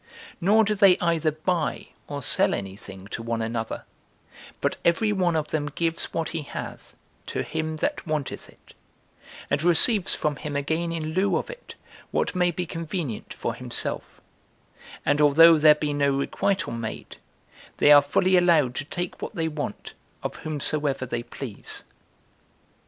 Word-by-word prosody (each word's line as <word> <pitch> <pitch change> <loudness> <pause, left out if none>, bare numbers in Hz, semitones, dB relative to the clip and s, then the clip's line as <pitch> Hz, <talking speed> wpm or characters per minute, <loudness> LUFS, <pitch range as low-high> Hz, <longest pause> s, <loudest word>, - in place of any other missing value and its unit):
Nor 210 +5 +4
do 215 0 +1
they 195 -3 +5
either 165 -2 +1
buy 155 +1 -2 0.2
or 140 -1 -5
sell - - +4
any 95 -1 -6
thing 95 -1 -12
to 115 - -5
one 115 0 -3
another; 115 0 -4 0.7
but - - -1
every 210 +5 +2
one 180 -4 +1
of 155 -1 -1
them 150 -2 -2
gives 165 +3 -1
what 165 -1 -2
he 165 - -4
hath 145 - -8 0.3
to - - -2
him 160 0 -3
that 285 - -3
wanteth 150 -3 -3
it, - - -20 0.8
and 140 - +1
receives 175 +5 +5
from 150 -2 -1
him 150 -2 -6
again 160 +4 -1
in 160 -1 -4
lieu 195 +3 +2
of - - -4
it - - -12 0.3
what - - -1
may 180 -1 +2
be 180 0 -3
convenient 165 - -5
for - - -3
himself; - - -2 0.9
and 145 +1 +2
although 160 +2 +7
there 150 0 +7
be 150 -1 -2
no 140 -1 +1
requital 185 +1 -1
made, 115 -1 -6 0.6
they 145 - +5
are 145 -1 +9
fully 180 +6 +2
allowed 165 -8 +4
to 145 - -4
take 175 +3 -5
what - - -6
they 165 -2 -1
want 150 -8 -5 0.3
of - - -4
whomsoever 145 -3 0
they 120 -1 -3
please. 120 -2 -4
155 Hz, 160 wpm, -25 LUFS, 140-175 Hz, 0.9 s, are